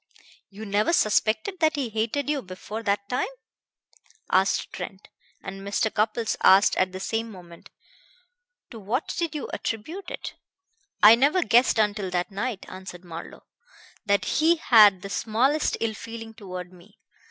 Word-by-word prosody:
"You 205 +2 -9
never 210 +9 +1
suspected 220 - +1
that 315 -1 +2
he 275 -5 -2
hated 225 +6 -2
you 295 -2 0
before 190 +3 -7
that 200 -2 -1
time?" 250 - -1 1.0
asked 190 +1 +1
Trent, 195 +1 -8 0.3
and 195 - -7
Mr. 200 +2 -1
Cupples 220 +1 0
asked 195 +2 +6
at 185 0 +1
the 185 - -7
same 225 +3 -2
moment: 175 -3 -14 1.0
"To 230 - -9
what 220 +8 -2
did 335 -2 -2
you 295 - -4
attribute 325 - -5
it?" - - -6 0.7
"I 210 +2 +11
never 285 +10 +3
guessed 240 -2 +4
until 210 -3 0
that 180 +2 -2
night," 205 +1 -4
answered 185 -1 -10
Marlowe, 165 -1 -9 0.6
"that 200 -2 +1
he 325 +2 +3
had 210 - +5
the 195 - -6
smallest 255 +10 +1
ill 225 -1 -1
feeling 225 0 -9
toward 185 -4 -8
me. 185 +5 -19
215 Hz, 150 wpm, -25 LUFS, 195-245 Hz, 1.0 s, I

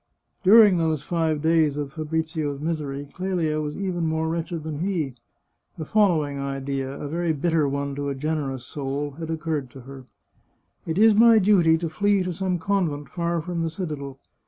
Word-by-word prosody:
During 205 -1 +7
those 160 -3 0
five 160 -3 -1
days 160 -3 +3
of 145 -1 -4
Fabrizio's 155 -2 -2
misery, 145 -3 -3
Clelia 175 -5 -1
was 150 0 -4
even 180 -4 -2
more 160 0 -1
wretched 165 0 -3
than 155 -2 -5
he. 170 -7 -1 0.6
The 155 - -5
following 155 -9 +2
idea, 135 -1 -3
a - - -5
very 165 +2 -1
bitter 155 0 +1
one 140 0 -2
to 140 0 -3
a 140 - -3
generous 135 -3 -3
soul, 145 +1 -4
had 160 -1 -5
occurred 155 -4 -2
to 135 - -12
her: 135 +1 -11 0.4
" - - -44
It 160 +1 -2
is 220 +1 +6
my 230 +1 +7
duty 185 -6 +4
to 165 +1 -3
flee 200 +4 +1
to 180 -1 -3
some 185 +1 -1
convent 165 -5 -1
far 170 -1 -1
from 170 +1 -3
the 165 - 0
citadel. 150 -6 -5
160 Hz, 180 wpm, -24 LUFS, 145-175 Hz, 0.6 s, During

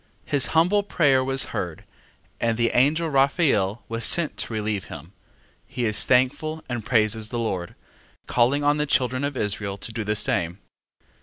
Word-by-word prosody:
His 140 -2 +2
humble 180 +6 +4
prayer 145 -9 +2
was 135 +1 0
heard, 85 -4 -5 0.5
and 115 -1 0
the 115 -1 +1
angel 150 +6 +2
Raphael 135 - +1
was 115 0 -4
sent 160 +7 +3
to - - -3
relieve 105 -3 -2
him: 80 +6 -11 0.5
he 125 -1 -3
is 105 -1 +3
thankful 145 +5 +1
and 120 -3 -4
praises 110 -1 +1
the 120 - -4
Lord, 95 -7 -3 0.5
calling 130 +4 +1
on 145 +1 +2
the 150 0 -1
children 130 -1 +1
of 140 -1 -3
Israel 100 -2 -2
to 110 +3 -8
do 110 - -3
the 105 +1 -1
same. 85 -4 -1
120 Hz, 165 wpm, -24 LUFS, 105-145 Hz, 0.5 s, humble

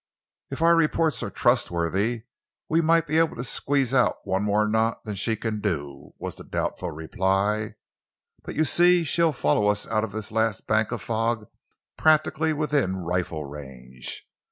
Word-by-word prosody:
"If 160 - -3
our 170 0 +6
reports 160 -4 +1
are 115 - -3
trustworthy, 105 0 0 0.4
we 165 +2 +2
might 165 0 +3
be 155 0 +1
able 165 -1 +1
to 125 - -5
squeeze 135 0 0
out 125 -2 +3
one 95 +1 -1
more 105 +1 +1
knot 110 +1 0
than 105 - -4
she 105 +3 +1
can 110 -1 -3
do," 70 -8 -4
was - - -5
the - - -10
doubtful 90 - -3
reply, 95 +7 -1 0.7
"but, - - -8
you 155 - +2
see, 175 +2 +5
she'll 165 +1 +3
follow 105 - +1
us 105 0 +1
out 110 -1 0
of 110 - -4
this 110 0 -4
last 110 -2 0
bank 110 0 +1
of 115 -4 -4
fog 115 -1 -1 0.5
practically 155 0 +3
within 145 -10 0
rifle 85 -3 -3
range. 65 -3 -7
110 Hz, 165 wpm, -25 LUFS, 95-145 Hz, 0.7 s, our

